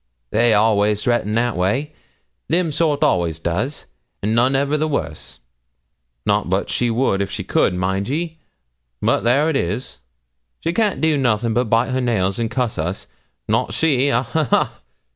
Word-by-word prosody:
They 115 0 +3
always 105 -1 +2
threatens 120 -3 0
that 120 0 +1
way 130 +12 -1 0.5
them 170 0 +1
sort 150 -1 +1
always 85 -3 +1
does, 90 - -2 0.4
and 105 +2 +1
none 125 +4 +3
ever 140 +2 +1
the 155 +1 0
worse 80 - -4 0.8
not - - +1
but - - 0
she 120 - +1
would 115 -4 +1
if 100 - -2
she - - -4
could, - - +1
mind 95 +3 -1
ye, 160 +3 -3 0.6
but - - +1
there 130 +6 +3
it 160 - 0
is; 105 +3 -3 0.6
she 165 - -1
can't 210 -1 +1
do 160 -2 +3
nothing 115 -3 +1
but 125 +2 +1
bite 115 +4 +2
her 130 0 0
nails 100 -5 0
and 115 -1 -1
cuss 125 -5 -2
us 90 +5 -3 0.4
not - - 0
she 140 -4 +2
ha, 125 -1 +2
ha, 155 +6 -1
ha!' - - 0
120 Hz, 170 wpm, -20 LUFS, 105-140 Hz, 0.8 s, They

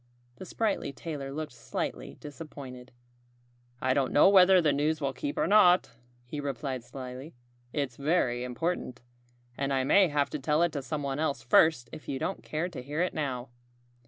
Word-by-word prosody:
The 190 - -9
sprightly 215 -9 -1
tailor 140 -1 -6
looked 150 +1 -5
slightly - - -5
disappointed. 135 -4 -10 0.9
"I 130 0 +1
don't 135 -2 +1
know 150 - +6
whether 190 -1 +7
the 155 -4 +3
news 150 +2 +1
will 140 -2 -1
keep 290 - -4
or - - +2
not," 190 -3 +5 0.3
he 145 +5 -6
replied 135 -2 -3
slyly. 130 +4 -8 0.4
"It's 140 -4 -2
very 140 -5 +1
important. 125 -1 -3 0.6
And 140 0 -1
I 135 -1 +1
may 190 +8 +5
have 145 -2 0
to 150 - -3
tell 150 +4 +2
it 175 - +2
to 145 - -3
someone 140 0 -3
else 140 -7 -1
first 125 +1 +4
if 155 - -9
you 135 - -2
don't 190 +8 -3
care 155 +3 -2
to 175 -7 -7
hear 145 +6 -2
it 180 - -2
now." 130 -5 -3
145 Hz, 175 wpm, -29 LUFS, 130-165 Hz, 0.9 s, whether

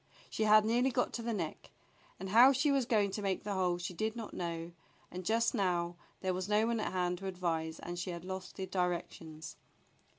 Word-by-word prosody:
She 220 - 0
had 215 0 +7
nearly 240 +4 +3
got 250 -1 0
to 235 - -3
the 230 0 -2
neck, 170 -8 -4 0.5
and 190 +1 -5
how 245 +7 +8
she 280 +3 +2
was 270 -3 +2
going 205 -4 +2
to 210 - -4
make 195 -2 -1
the 205 - -2
hole 180 -2 +1
she 175 +1 -5
did 220 +5 -2
not 225 -2 -6
know, 170 -1 -4 0.4
and 185 +1 -6
just 225 +4 +2
now 175 -5 0 0.3
there 185 -1 0
was 185 +2 -3
no 210 +1 +4
one 230 -1 0
at - - -2
hand 180 -1 0
to 195 - -5
advise 165 -3 -2
and 175 0 -6
she 175 - -3
had 170 0 -6
lost 190 0 -6
the 190 - -3
directions. 170 -3 -3
190 Hz, 220 wpm, -33 LUFS, 175-220 Hz, 0.5 s, how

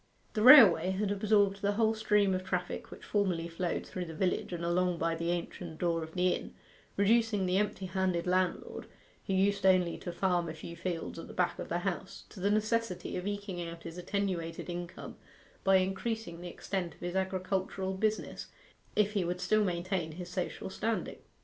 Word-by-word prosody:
The 215 - -1
railway 210 - +9
had 195 +2 0
absorbed 200 -1 +2
the 205 0 +1
whole 220 +1 +3
stream 210 -3 +2
of 185 0 -1
traffic 180 -1 -3
which - - -11
formerly 185 -5 0
flowed 170 +1 -2
through 180 -1 -5
the 160 -1 -8
village 185 +2 0
and 170 -1 -3
along 180 0 +1
by 165 0 0
the 170 +1 -2
ancient 175 -1 -4
door 170 -1 0
of 160 0 -7
the 180 0 +3
inn, - - -3 0.4
reducing 210 -1 +3
the 185 +1 +2
empty 210 -2 -1
handed 185 -2 0
landlord, 185 -1 -1 0.4
who 195 - 0
used 200 +1 +2
only 185 -2 +3
to 175 - -5
farm 175 -2 0
a 155 - -6
few 170 +2 -8
fields 170 -1 -4
at - - -8
the - - -11
back 180 -1 0
of - - -5
the 170 - 0
house, 190 +1 -4
to - - -12
the 195 +2 +1
necessity 215 -3 0
of 180 +2 -3
eking 200 -3 -4
out 170 -1 -7
his 165 +1 -7
attenuated 180 -3 -2
income 175 0 -7 0.5
by 195 0 +5
increasing 190 -1 -1
the 175 - -6
extent 180 0 -4
of - - -25
his 175 +1 -4
agricultural 190 0 -1
business 215 +3 -2 0.5
if 210 -1 +3
he 200 -3 +1
would 175 +1 -2
still 215 +4 +2
maintain 175 -3 -2
his 175 +2 -7
social 185 +1 -4
standing. 225 +3 -2
185 Hz, 190 wpm, -31 LUFS, 175-200 Hz, 0.5 s, railway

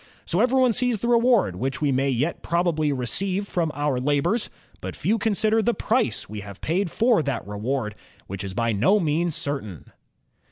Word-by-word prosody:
So 175 - 0
everyone 255 +1 +3
sees 245 -2 +1
the 235 - -2
reward 235 - +3
which 135 +6 -2
we 145 -2 +1
may 135 +1 +1
yet 135 +6 -1
probably 170 -3 +1
receive 185 - -1
from 170 -5 -1
our 145 -3 0
labors; 145 - +1 0.3
but - - -6
few 220 +2 0
consider 220 +1 +2
the 235 +2 +1
price 220 - 0
we 105 0 -7
have 100 -1 -10
paid 180 +4 -1
for 230 +1 +3
that 140 -5 -3
reward, 105 +2 -2 0.3
which 100 +1 -6
is 95 -1 -6
by 115 +1 +1
no 115 - +3
means 165 -1 0
certain." 120 - -5
155 Hz, 175 wpm, -24 LUFS, 125-210 Hz, 0.3 s, everyone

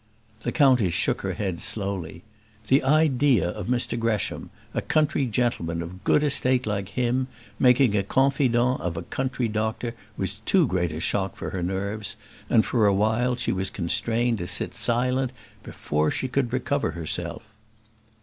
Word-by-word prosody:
The - - -2
countess 125 - +4
shook - - +1
her - - -2
head 95 -5 -3
slowly; 95 -5 -3 0.5
the 135 +2 +5
idea 135 - +3
of - - -6
Mr 120 -1 0
Gresham, 115 -3 -1 0.2
a - - -1
country 150 -3 +1
gentleman 105 -8 -1
of 90 +3 -10
good 150 - +3
estate 130 -3 +2
like 100 -2 -2
him, 125 +2 0 0.3
making 125 -3 +5
a 100 - +3
confidant 130 +1 +2
of 85 -1 -3
a 85 - -4
country 130 +4 -2
doctor 110 +2 -2 0.2
was 95 +2 -3
too 180 - +4
great 90 - 0
a 80 - -5
shock 95 +3 -1
for - - -5
her 95 - -3
nerves; 100 +3 -3 0.3
and 110 - +4
for 110 -4 +2
a 100 - +4
while 110 +5 +1
she 120 - -1
was 95 0 -1
constrained 115 +6 0
to 90 - -4
sit 90 - -3
silent 125 +2 0 0.3
before 75 +1 -1
she 130 - -2
could 130 -2 -1
recover 140 +3 0
herself. 85 -2 -4
115 Hz, 160 wpm, -25 LUFS, 95-130 Hz, 0.5 s, the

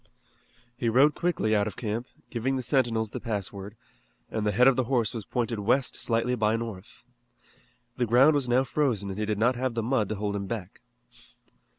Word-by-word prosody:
He 120 -1 -1
rode 135 +6 +5
quickly 165 -12 0
out 105 0 +2
of 105 - -6
camp, 115 +2 -3 0.2
giving 130 +3 -1
the 130 - -2
sentinels 115 -4 +1
the - - -5
pass 105 -5 -3
word, 100 +2 -8 0.6
and 105 -1 -1
the - - +2
head 125 +6 +5
of 135 - +5
the 130 -1 0
horse 120 -4 0
was 110 -4 -6
pointed 120 -2 -2
west 125 +5 +1
slightly 115 +1 0
by 110 -2 +1
north. 115 -5 -7 0.9
The 120 -2 0
ground 130 +7 +6
was 140 -4 0
now 125 +2 +4
frozen 120 -8 -1
and 95 - -6
he 105 - -1
did 105 -1 -1
not 120 +4 +2
have 125 -1 -2
the 115 - -1
mud 115 -4 0
to 110 - -2
hold 100 0 -2
him 100 -1 -3
back. 105 -4 -6
115 Hz, 205 wpm, -27 LUFS, 105-125 Hz, 0.9 s, ground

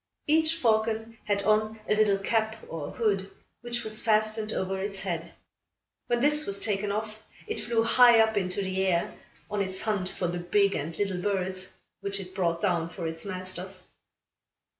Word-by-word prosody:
Each 315 +1 +4
falcon 225 -4 +1
had 200 -1 +1
on 215 +1 +2
a - - +3
little 210 -2 +4
cap 220 +2 0
or 155 -3 -5
hood, 195 -4 0 0.3
which 240 0 -3
was 215 0 -3
fastened 215 0 +1
over 190 -1 -2
its 195 -1 -3
head. 170 -3 -3 0.8
When 240 0 +1
this 300 +2 +3
was 200 0 0
taken 205 -1 0
off, 215 +1 -4 0.2
it 435 - -3
flew 230 -1 +1
high 240 0 +7
up 220 0 +4
into 190 0 0
the 190 0 -1
air, 175 -3 +1 0.3
on 205 -1 -1
its 190 -1 -2
hunt 200 -4 -1
for 180 - -2
the 175 +1 -2
big 200 +3 +2
and 160 +3 -4
little 195 -3 -1
birds, 190 -1 -2 0.2
which 200 0 -3
it 185 -1 -8
brought 170 -3 0
down 175 -5 +1
for 170 0 -6
its 160 +2 -4
masters. 185 0 -5
200 Hz, 175 wpm, -28 LUFS, 185-220 Hz, 0.8 s, high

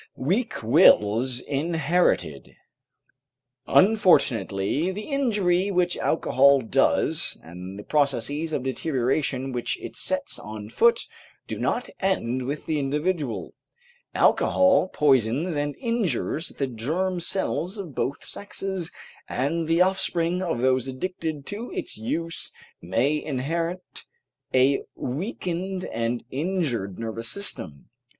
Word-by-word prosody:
WEAK 190 - -1
WILLS 120 - +5
INHERITED 155 - 0 1.1
Unfortunately, 155 - +3
the 205 +3 -5
injury 205 -10 +1
which 180 -2 +1
alcohol 140 -2 +4
does, 115 - +2
and 90 +4 -9
the 105 - -8
processes 145 +3 0
of 135 - -1
deterioration 130 -1 -1
which 120 -1 -2
it - - -8
sets - - -2
on 105 0 -8
foot, 235 - +4 0.4
do - - -5
not - - -1
end 130 -10 0
with 145 +2 -4
the 155 -2 0
individual. 150 -1 -2 0.6
Alcohol 275 -8 +4
poisons 140 +1 +2
and 145 0 -1
injures 205 - -1
the 140 - -2
germ 160 +10 -2
cells 185 +2 -1
of 180 -8 -6
both 140 - -3
sexes, 195 -3 -4 0.4
and 155 +5 -1
the 165 +2 +3
offspring 180 -2 +1
of 165 -10 -1
those 130 0 +2
addicted 155 +1 -4
to 215 +4 -5
its 370 -5 -4
use 165 +10 -3 0.3
may 125 - 0
inherit 165 +6 -3 0.5
a 130 +2 +4
weakened 185 - -3
and 115 +1 -2
injured 140 - -1
nervous 115 0 -5
system. 80 - -5
150 Hz, 110 wpm, -25 LUFS, 125-185 Hz, 1.1 s, WILLS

